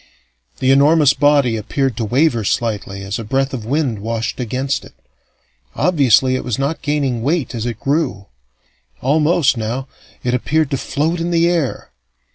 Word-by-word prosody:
The 130 - +2
enormous 145 +1 +5
body 140 -4 +3
appeared 130 +4 -1
to 115 - -1
waver 125 0 +2
slightly 100 -2 -2
as 95 +2 -4
a - - -5
breath 135 +5 -1
of 115 -5 -5
wind 130 -4 -1
washed 115 +3 -3
against 130 +3 -2
it: - - -15 0.8
obviously 130 -7 +3
it - - -3
was 120 -4 -2
not 140 +4 -2
gaining 140 -5 -1
weight 140 -1 -1
as 115 0 -3
it 115 -2 -4
grew. 135 -9 -1 0.8
Almost, 150 0 +2
now, 120 +5 -3 0.4
it 125 - 0
appeared 150 +4 0
to 135 - 0
float 160 +6 -1
in 170 +1 -2
the 170 0 +3
air. 170 -6 -1
135 Hz, 160 wpm, -18 LUFS, 115-150 Hz, 0.8 s, enormous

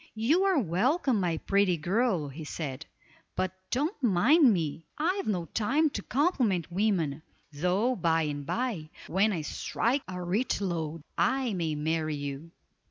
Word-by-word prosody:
"You 255 +12 +2
are 385 -4 +3
welcome, 245 - +1
my 175 -3 0
pretty 195 0 +2
girl," 185 0 +1
he 150 +4 -8
said, 150 -1 -5 0.5
"but 185 -1 -1 0.2
don't 295 - -1
mind 245 - +5
me; 165 -4 -2
I've 365 +6 0
no 180 -5 0
time 280 - +1
to - - -4
compliment 245 - +1
women, 170 -7 0 0.3
though 185 - +1
by 165 -4 +2
and 145 -1 -3
by, 200 - -2 0.2
when 200 +4 +2
I 165 -6 -2
strike 245 - -1
a 180 0 -5
rich 200 +9 0
lode, 165 -5 -3 0.2
I 240 +7 +1
may 165 -4 -1
marry 155 0 -1
you." 145 +2 -5
185 Hz, 150 wpm, -29 LUFS, 160-245 Hz, 0.5 s, mind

